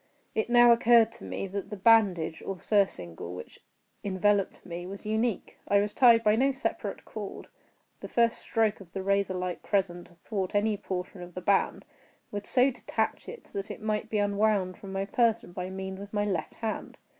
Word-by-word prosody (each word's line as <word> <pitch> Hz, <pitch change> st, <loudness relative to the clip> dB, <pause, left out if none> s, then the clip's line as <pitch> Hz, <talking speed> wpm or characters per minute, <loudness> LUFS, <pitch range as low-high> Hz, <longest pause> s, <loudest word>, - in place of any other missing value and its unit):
It 220 Hz, +1 st, -1 dB
now 240 Hz, 0 st, +7 dB
occurred 235 Hz, -1 st, +5 dB
to 235 Hz, -, -13 dB
me -, -, -4 dB
that 195 Hz, +1 st, -5 dB
the 210 Hz, -, -6 dB
bandage, 190 Hz, -7 st, +3 dB
or 195 Hz, -2 st, -5 dB
surcingle, 90 Hz, -, -1 dB
which 90 Hz, -, -10 dB, 0.4 s
enveloped 200 Hz, 0 st, +1 dB
me, 175 Hz, 0 st, -6 dB
was 195 Hz, +2 st, -8 dB
unique. 220 Hz, +1 st, -1 dB
I 200 Hz, -, +4 dB
was 205 Hz, +1 st, -1 dB
tied 235 Hz, -3 st, +6 dB
by 210 Hz, -1 st, +4 dB
no 270 Hz, +4 st, +3 dB
separate 270 Hz, 0 st, -4 dB
cord. -, -, -7 dB, 0.5 s
The -, -, -7 dB
first 235 Hz, -1 st, +2 dB
stroke 220 Hz, -2 st, 0 dB
of 185 Hz, -4 st, -14 dB
the 190 Hz, -, -4 dB
razorlike 190 Hz, -2 st, 0 dB
crescent 175 Hz, -3 st, -1 dB
athwart 185 Hz, +3 st, -4 dB
any 210 Hz, +1 st, +2 dB
portion 185 Hz, -1 st, -5 dB
of 175 Hz, 0 st, -10 dB
the -, -, -3 dB
band, 195 Hz, +2 st, +1 dB, 0.5 s
would 205 Hz, 0 st, -5 dB
so 255 Hz, +2 st, +4 dB
detach 245 Hz, -, -3 dB
it 480 Hz, -, -9 dB
that 200 Hz, +1 st, -4 dB
it -, -, -6 dB
might 215 Hz, -1 st, -2 dB
be 215 Hz, -, -1 dB
unwound 205 Hz, -2 st, +1 dB
from 195 Hz, -, -9 dB
my 195 Hz, 0 st, -2 dB
person 230 Hz, -2 st, +1 dB
by 180 Hz, +1 st, -5 dB
means 190 Hz, 0 st, -6 dB
of 200 Hz, 0 st, -9 dB
my 205 Hz, 0 st, +1 dB
left 185 Hz, -6 st, -2 dB
hand. 225 Hz, -1 st, -4 dB
200 Hz, 185 wpm, -28 LUFS, 185-220 Hz, 0.5 s, now